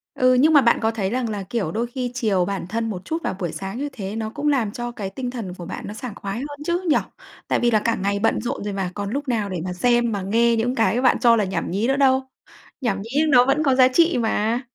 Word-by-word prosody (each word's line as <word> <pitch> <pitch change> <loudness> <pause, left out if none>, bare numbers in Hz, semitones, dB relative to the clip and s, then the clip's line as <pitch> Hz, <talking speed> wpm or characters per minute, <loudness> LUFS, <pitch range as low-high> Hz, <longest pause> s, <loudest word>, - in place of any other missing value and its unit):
Ừ, 255 0 +4
nhưng 290 +6 +4
mà 290 - +8
bạn 235 -3 +3
có 225 - +1
thấy 205 -4 -2
rằng 250 0 -1
là, 205 -2 -3
kiểu, 195 -2 -3
đôi 230 +5 -1
khi 245 0 -4
chiều 210 -7 +1
bản 195 -1 -4
thân 225 +4 -2
một 185 -3 -6
chút 325 - -3
vào - - -2
buổi 175 -4 -3
sáng 195 +4 -6
như 290 +2 -2
thế 200 -1 -6
nó 220 -1 -3
cũng 290 +5 -2
làm 245 -8 +1
cho 240 +1 -4
cái 200 -4 -5
tinh 250 +5 -4
thần 225 -8 -6
của 175 -2 -9
bạn 185 - -6
nó 205 - -6
sảng 240 -1 -7
khoái 195 0 -5
hơn 290 +2 -7
chứ, 345 +1 0
nhỉ? 305 - +4 0.5
Tại - - +1
vì 240 - +3
là 220 - +4
cả 230 - +2
ngày 200 +1 -1
bận 225 - +1
rộn 245 0 -4
rồi 205 - -3
mà, 195 -2 -2
còn 200 -1 -4
lúc 280 +4 -3
nào 220 -5 0
để 185 - -3
mà 180 - -3
xem, 240 +5 +2
mà 200 -2 -2
nghe 230 +4 +2
những 240 +3 0
cái 230 0 +2
bạn 255 -1 +4
cho 235 -1 +5
là 215 - +2
nhảm 190 - -3
nhí 200 +6 0
nữa 270 - +2
đâu? 265 -1 +3 0.6
Nhảm 200 -7 -1
nhí 225 - -10 0.2
nó 250 -4 +6
vẫn 275 +4 +2
có 270 -3 +3
giá 255 -1 +6
trị 335 +4 +3
mà, 225 0 0
230 Hz, 285 wpm, -22 LUFS, 200-255 Hz, 0.6 s, mà